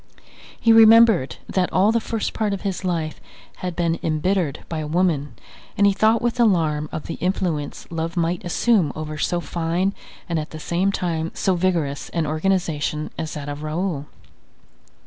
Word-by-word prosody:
He 230 - +5
remembered 225 - +6
that 185 -2 0
all 195 +4 +4
the 230 - +2
first 225 -1 -3
part 215 -2 -1
of 195 - -4
his 195 -1 -3
life 165 -4 -2 0.4
had 180 -2 -4
been 170 -1 0
embittered 160 -1 -1
by 160 - -4
a 155 - -4
woman 155 -6 0 0.4
and 200 - +4
he 200 - +5
thought 220 +3 +3
with 240 +1 -1
alarm 160 -9 +2
of 155 - -5
the - - -6
influence 175 -5 -2
love 165 +1 -3
might 170 +1 0
assume 180 -2 +2
over 155 -1 -5
so 175 - 0
fine, 175 +3 -1 0.3
and 170 -3 -1
at 150 - -5
the 155 - -8
same 180 +5 0
time 165 -4 -2
so 190 - +1
vigorous 170 -6 -1
an 165 -2 +1
organization 155 -2 -1
as 160 -1 -5
that 145 -1 -6
of 145 0 -5
Raoul. 155 -1 -3
170 Hz, 170 wpm, -22 LUFS, 155-195 Hz, 0.4 s, remembered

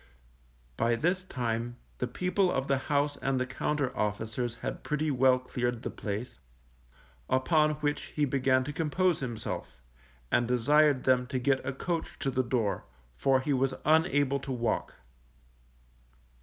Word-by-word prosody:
_ - - -32
By 115 0 +2
this 180 +8 0
time 120 -4 -3 0.2
the 125 - 0
people 180 +7 +1
of 135 - -1
the 135 -1 +2
house 145 0 +1
and 135 -1 0
the 130 - 0
Compter 135 0 -2
officers 110 +3 -2
had - - -3
pretty 150 0 -1
well 130 -1 +4
cleared 120 -2 -3
the - - -3
place, 105 - -5 0.9
upon 150 +4 +3
which 145 0 0
he 150 - +2
began 130 -1 +2
to 150 +3 -5
compose 170 +2 +1
himself, 110 - -5 0.5
and 120 - +3
desired 140 +3 +4
them 125 -1 +3
to 130 0 -2
get 130 +1 +1
a 130 - -2
coach 165 +5 -3
to 135 - -1
the 130 0 +1
door, 120 -5 -1 0.3
for 130 - +2
he 140 +2 0
was 130 0 +1
unable 145 -3 +3
to 135 - -6
walk. 120 -2 -1
130 Hz, 155 wpm, -30 LUFS, 120-150 Hz, 0.9 s, well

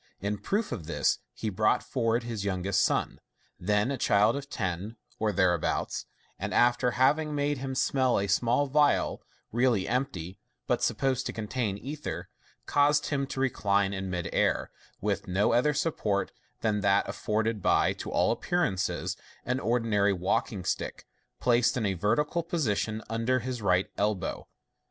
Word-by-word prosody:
In 100 +1 -2
proof 210 +2 -1
of 80 -5 -5
this, 85 - +1
he 110 - -4
brought 105 +3 +2
forward 115 -2 0
his 115 -4 -4
youngest 100 0 0
son, - - 0 0.4
then 105 +6 +1
a 135 - -3
child 105 +3 +4
of 140 0 -6
ten 95 +2 -3 0.2
or 110 -1 +1
there 95 -3 +3
abouts, 85 - -2 0.3
and - - -3
after 120 +1 +4
having 150 +4 +3
made 145 -1 0
him 135 0 -4
smell 130 -1 +2
at 100 - +1
a - - -4
small 120 +8 +2
phial, 145 +1 +2 0.3
really 120 -4 +2
empty, 110 -9 -2 0.3
but - - 0
supposed 135 -1 0
to - - -4
contain 110 -2 -2
ether, 145 +7 -6 0.4
caused 145 +1 +3
him 140 -2 0
to 135 - -5
recline 100 -6 +1
in 95 -1 -4
mid 90 -2 -2
air, - - +1 0.3
with 100 0 -1
no 95 +5 +2
other 125 +6 +4
support 110 -10 0 0.3
than 105 -2 +1
that 100 +1 +3
afforded 110 0 -1
by, - - +3
to - - -7
all - - +2
appearance, 170 - 0 0.6
an 125 +1 0
ordinary 110 -5 +2
walking 95 +1 -1
stick, - - -3 0.3
placed 120 0 +3
in 115 - 0
a 100 - +1
vertical 115 - +1
position 115 - -1
under 115 +3 +1
his 125 -1 -4
right 90 -2 +2
elbow. 100 -4 -1
115 Hz, 160 wpm, -28 LUFS, 100-130 Hz, 0.6 s, child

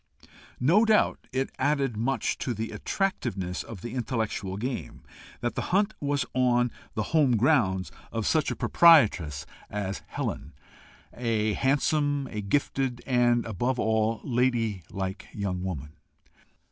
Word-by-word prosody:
No 170 - +5
doubt 220 -2 +2
it 130 +1 -1
added 140 -5 +1
much 125 +5 -1
to 125 - -2
the 110 +1 -4
attractiveness 95 - -2
of 110 -6 -9
the 120 0 -5
intellectual 110 -6 -2
game 125 +4 -5 0.4
that 120 0 -1
the - - -2
hunt 205 +4 +2
was 145 -1 0
on 120 -1 +2 0.2
the 110 - 0
home 140 -7 +4
grounds 100 - +2 0.2
of 115 -2 -2
such 155 -2 +2
a - - -2
proprietress 95 - +4 0.2
as 100 -2 -3
Helen - - -4 0.6
a 110 -3 0
handsome, 145 +2 +1
a 105 - -3
gifted, 130 +3 -1
and, 120 -2 +3
above 120 +5 -1
all, 110 0 +1
a - - -14
ladylike 110 - -1
young 95 -3 -3
woman. 75 -6 -5
120 Hz, 135 wpm, -27 LUFS, 105-135 Hz, 0.6 s, No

